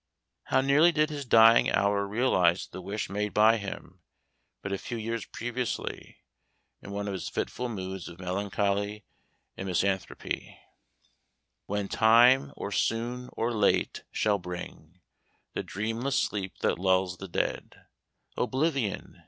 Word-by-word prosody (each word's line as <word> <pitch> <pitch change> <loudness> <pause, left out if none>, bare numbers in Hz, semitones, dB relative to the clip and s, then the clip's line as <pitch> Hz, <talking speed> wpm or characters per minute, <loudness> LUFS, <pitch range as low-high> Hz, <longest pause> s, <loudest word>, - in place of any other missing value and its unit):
How - - +2
nearly 145 +6 +5
did 155 -1 +1
his 145 -2 -5
dying 115 -1 +6
hour 100 0 +2
realize 95 -6 +2
the 95 - -9
wish 100 +4 -4
made 105 0 -3
by 110 +2 +6
him, 100 -2 -8 0.6
but 100 - -4
a 100 - -2
few 120 - -5
years 115 0 -4
previously, 120 0 -4 0.6
in - - -10
one 100 0 -3
of 100 - -2
his 95 - -4
fitful 125 0 -3
moods 95 -4 -5
of 85 - -12
melancholy 100 +2 -1 0.5
and 95 - -6
misanthropy: 95 +1 -2 1.1
"When 100 0 -2
time, 120 +6 +5
or 100 - -5
soon 120 +4 -1
or 115 +1 -1
late, 105 -3 +1
shall 105 -2 +1
bring 90 -1 -8 0.5
The - - -2
dreamless 115 +6 -2
sleep 95 -3 -3
that - - +1
lulls 95 -1 +2
the 95 - -7
dead, 85 - -3 0.5
Oblivion! 130 -3 -1
105 Hz, 135 wpm, -28 LUFS, 95-120 Hz, 1.1 s, dying